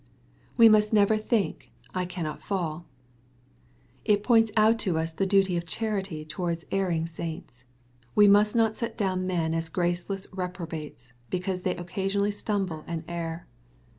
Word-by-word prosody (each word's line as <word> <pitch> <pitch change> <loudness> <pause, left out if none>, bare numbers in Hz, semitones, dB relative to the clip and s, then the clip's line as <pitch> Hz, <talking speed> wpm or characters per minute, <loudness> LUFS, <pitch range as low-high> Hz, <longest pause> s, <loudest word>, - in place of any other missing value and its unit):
We 230 -2 +9
must 215 -1 +5
never 210 0 +5
think, 215 -1 -1 0.2
'^ - - -24
I 185 -1 -1
cannot 170 -4 -5
fall/' 170 -4 -3 1.2
It 205 -1 +2
points 225 -2 +4
out 220 +1 +5
to 180 -7 0
us 160 0 -2
the 195 +4 0
duty 195 -2 +3
of 170 0 -4
charity 195 -5 -3
towards 170 +1 -3
erring 175 -4 0
saints. 160 -7 -7 0.5
We 205 0 +7
must 205 +2 +5
not 225 -2 +3
set 230 +1 -4
down 185 -3 0
men 165 -3 0
as 165 0 -2
graceless 180 +3 -2
reprobates^ 165 -8 -6 0.2
because 185 0 -2
they 180 0 -1
occasionally 195 +3 -1
stumble 195 -6 -2
and 165 -1 -4
err. 170 -1 -4
185 Hz, 150 wpm, -27 LUFS, 165-205 Hz, 1.2 s, We